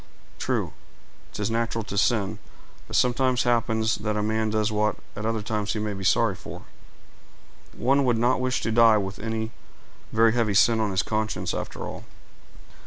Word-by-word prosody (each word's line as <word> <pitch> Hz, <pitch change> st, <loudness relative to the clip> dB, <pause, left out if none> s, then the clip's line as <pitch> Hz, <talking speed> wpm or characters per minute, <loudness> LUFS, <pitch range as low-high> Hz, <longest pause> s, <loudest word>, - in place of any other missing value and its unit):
"True—'tis 105 Hz, +1 st, -5 dB
natural 115 Hz, 0 st, -1 dB
to 100 Hz, -, -6 dB
sin; 105 Hz, -1 st, +1 dB, 0.5 s
but -, -, -1 dB
it -, -, +6 dB
sometimes 125 Hz, 0 st, +2 dB
happens 115 Hz, -2 st, +1 dB
that 105 Hz, 0 st, -2 dB
a 105 Hz, -, 0 dB
man 110 Hz, +1 st, 0 dB
does 110 Hz, 0 st, 0 dB
what 105 Hz, 0 st, +1 dB, 0.2 s
at 110 Hz, +1 st, -3 dB
other 115 Hz, -2 st, -1 dB
times 105 Hz, -1 st, -2 dB
he 110 Hz, -, -3 dB
may 105 Hz, -1 st, -2 dB
be 95 Hz, -1 st, -6 dB
sorry -, -, +3 dB
for. -, -, -10 dB, 1.1 s
One 135 Hz, +3 st, +3 dB
would 120 Hz, -2 st, +2 dB
not 125 Hz, +3 st, +2 dB
wish 130 Hz, 0 st, 0 dB
to 115 Hz, -, -1 dB
die 115 Hz, -1 st, +6 dB
with 95 Hz, -1 st, -4 dB
any 110 Hz, +1 st, -3 dB, 0.6 s
very 115 Hz, 0 st, +4 dB
heavy 115 Hz, -4 st, +1 dB
sin 115 Hz, +2 st, +5 dB
on 110 Hz, -1 st, +1 dB
his 95 Hz, 0 st, 0 dB
conscience, 105 Hz, -5 st, -2 dB
after -, -, -5 dB
all." -, -, -7 dB
110 Hz, 175 wpm, -25 LUFS, 105-115 Hz, 1.1 s, it